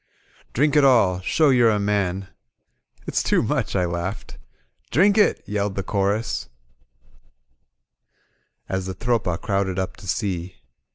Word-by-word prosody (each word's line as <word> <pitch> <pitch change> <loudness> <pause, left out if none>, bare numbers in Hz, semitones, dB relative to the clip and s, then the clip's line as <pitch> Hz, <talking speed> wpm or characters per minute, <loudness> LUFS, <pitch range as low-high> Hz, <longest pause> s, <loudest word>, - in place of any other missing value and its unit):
*^Drink 145 +3 +2
it 150 - +5
alL 110 -9 +4
Show 150 +9 +3
you're 120 -3 +5
a 105 - +2
man." 100 -2 -1 0.8
It'8 - - -1
too - - +2
much," - - -1
I 90 -2 +2
laughed. 85 +4 -5 0.5
"Drink 195 +9 +4
it," 215 - +3
yelled 105 -1 -2
the 100 - -2
chorus 100 - -1 2.2
as 95 0 -3
the 95 - -5
Tropa 115 -6 -1
crowded 95 -2 -1
up 95 0 -3
to 95 - -12
see. 95 -2 -3
100 Hz, 130 wpm, -23 LUFS, 95-115 Hz, 2.2 s, it